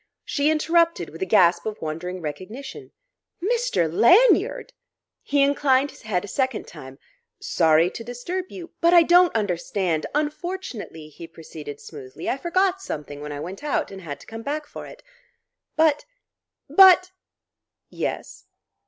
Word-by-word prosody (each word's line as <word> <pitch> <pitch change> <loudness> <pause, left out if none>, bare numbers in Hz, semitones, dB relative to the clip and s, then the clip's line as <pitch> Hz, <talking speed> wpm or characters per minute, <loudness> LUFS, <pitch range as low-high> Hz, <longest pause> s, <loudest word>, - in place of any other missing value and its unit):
She 285 +1 0
interrupted 335 +2 +1
with - - -12
a 380 - -1
gasp 175 -3 +3
of 215 0 -5
wondering 175 +4 -5
recognition: 215 - -8 0.5
"Mr. 465 - 0
Lanyard!" 380 - +4 0.5
He 285 -1 +1
inclined 280 -1 +2
his - - -17
head 205 -4 -2
a - - -10
second 260 +1 -2
time: 135 -4 -11 0.4
"Sorry 165 +1 +2
to 230 - -8
disturb 245 +11 -5
you 345 -2 -10
" - - -52
"But 340 +1 +5
I 340 - +8
don't 350 -1 +4
understand 180 -4 -1
" - - -10
"Unfortunately," 300 - -4
he 165 +2 -11
proceeded 155 -3 -10
smoothly, 145 0 -10
"I - - 0
forgot 370 +5 0
something 145 - -7
when 150 0 -6
I 145 - -6
went 185 - -8
out, 295 -8 -1
and 195 -1 -9
had 145 -5 -7
to - - -14
come 225 0 -8
back 295 +5 -4
for - - -10
it." - - -14 0.7
"But 310 -2 +2 0.6
but 370 -1 +6 0.4
" - - -63 0.2
"Yes?" - - -8
245 Hz, 155 wpm, -23 LUFS, -, 0.7 s, I